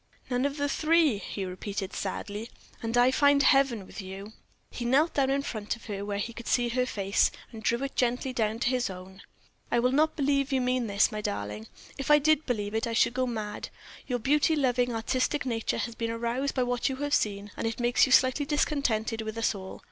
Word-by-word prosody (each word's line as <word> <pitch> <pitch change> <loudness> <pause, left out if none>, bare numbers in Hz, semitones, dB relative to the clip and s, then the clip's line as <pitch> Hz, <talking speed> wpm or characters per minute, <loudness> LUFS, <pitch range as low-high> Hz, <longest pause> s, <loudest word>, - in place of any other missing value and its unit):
"None 250 +2 +1
of 285 +1 -6
the 285 0 0
three!" 310 -6 +3
he 200 -1 -5
repeated, 195 +1 -5
sadly, 205 +3 -4 0.3
"and 230 0 -1
I 245 +1 +5
find 285 +1 +4
heaven 265 -8 +3
with 205 - -8
you." 195 +3 -8 0.4
He 245 - -5
knelt 275 +7 +3
down 270 -2 +2
in 275 +1 +1
front 215 -5 -3
of 230 - -16
her, 200 -2 -4
where 205 0 -3
he 230 +3 -3
could 235 0 -9
see 240 -1 +2
her 250 +1 0
face, 200 -3 +2 0.2
and 225 -2 -9
he - - +1
drew 235 +3 0
it 275 - -7
gently 250 +1 0
down 220 -2 0
to 245 - +2
his 250 -3 0
own. 190 +1 -10 0.5
"I - - +3
will 250 +1 +3
not 310 +3 +2
believe 280 -1 +1
you 265 - +2
mean 250 -1 0
this, 200 +3 +3
my 215 0 -4
darling; 105 - -4 0.3
if 275 - -4
I 295 - +8
did 310 +1 +2
believe 210 -4 -2
it 225 +1 0
I 230 - -3
should 225 - +3
go 255 0 0
mad. 215 -3 -4 0.4
Your 250 - 0
beauty 295 +6 +2
loving, 250 -3 +1
artistic 255 +5 0
nature 230 -3 -1
has 235 - -3
been 230 0 -3
aroused 235 +4 -2
by 255 - +2
what 245 +2 0
you 265 - -3
have 290 +2 -3
seen, 205 -3 0
and - - -2
it 225 - -4
makes 240 +2 +3
you - - -4
slightly 260 +3 +4
discontented 245 -7 0
with 220 0 -5
us 230 - +1
all. 190 -2 -8
240 Hz, 225 wpm, -28 LUFS, 215-270 Hz, 0.5 s, I